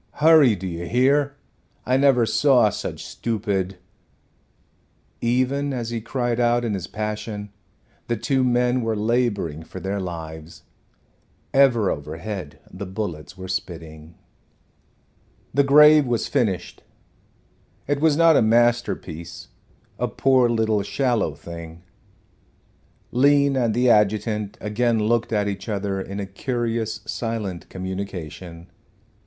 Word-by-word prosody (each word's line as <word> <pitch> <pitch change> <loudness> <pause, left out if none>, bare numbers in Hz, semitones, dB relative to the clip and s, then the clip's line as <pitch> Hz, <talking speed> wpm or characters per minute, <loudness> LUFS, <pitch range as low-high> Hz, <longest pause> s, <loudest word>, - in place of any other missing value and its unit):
Hurry, 150 -7 +5
do 95 0 -8
you 85 -1 -5
hear? 140 - +2 0.5
I 130 - +2
never 135 -3 +4
saw 125 -3 +4
such - - -6
stupid 100 -5 -2 0.8
" - - -40 0.2
Even 140 +2 0
as 120 -2 -4
he 115 -1 -3
cried 120 +1 -2
out 120 0 +2
in 110 - -1
his 95 -3 -4
passion 105 -1 -5 0.6
the 120 - -1
two 130 +4 0
men 125 0 +2
were 115 -1 -1
laboring 105 -8 0
for 80 +3 -9
their 95 +2 -3
lives. 80 -3 -7 0.9
Ever 125 -7 +4
overhead 80 +2 -6
the 95 +1 -7
bullets 95 -3 -6
were 95 0 -7
spitting. 80 -3 -6 1.4
The 140 +2 +4
grave 150 +1 +7
was 120 -2 0
finished, 110 -10 -1 1.1
It 145 0 0
was 155 -2 +3
not 165 -1 +6
a - - +5
masterpiece 110 -8 0 0.5
a - - 0
poor 130 -2 +3
little 110 -2 +1
shallow 115 - 0
thing. 85 +1 -10 1.3
Lean 140 +2 +4
and 120 -4 +1
the 125 0 +4
adjutant 105 0 +1
again 115 +3 0
looked 115 +2 0
at 105 -2 +1
each 100 +1 -5
other 100 -2 -2
in 100 +1 -6
a 100 - -3
curious 115 +1 -3
silent 110 -7 -4
communication. 90 -2 -7
110 Hz, 125 wpm, -23 LUFS, 95-125 Hz, 1.4 s, grave